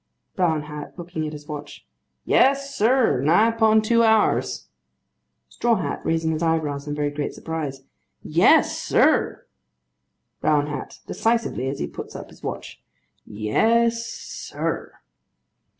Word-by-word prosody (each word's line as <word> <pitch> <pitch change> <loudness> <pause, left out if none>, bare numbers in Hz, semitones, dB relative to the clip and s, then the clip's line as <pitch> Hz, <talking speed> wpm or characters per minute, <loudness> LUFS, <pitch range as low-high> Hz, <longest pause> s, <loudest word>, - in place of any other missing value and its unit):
BROWN 160 -5 +1
HAT. 150 +1 -9
(Looking 170 -3 -4
at 150 - -6
his 150 0 -10
watch.) 150 -1 -8 0.4
Yes, 275 +1 +3
sir; 230 - +3
nigh 175 +10 +4
upon 220 -1 +3
two 230 +1 +3
hours. 220 -2 +2 0.8
STRAW 235 -1 +1
HAT. 190 - -3
(Raising 160 0 0
his 155 0 -2
eyebrows 155 -3 -1
in 145 - -3
very 145 -1 -1
great 145 0 -4
surprise.) 150 -5 -5 0.4
Yes, - - +4
sir! - - +2 0.9
BROWN 150 -1 +2
HAT. 150 0 -7
(Decisively, 225 - 0
as 135 - -4
he - - -2
puts - - -9
up - - -8
his - - -17
watch.) - - -6 0.5
Yes, 230 - +1
sir. 235 - -5
160 Hz, 130 wpm, -23 LUFS, 150-225 Hz, 0.9 s, nigh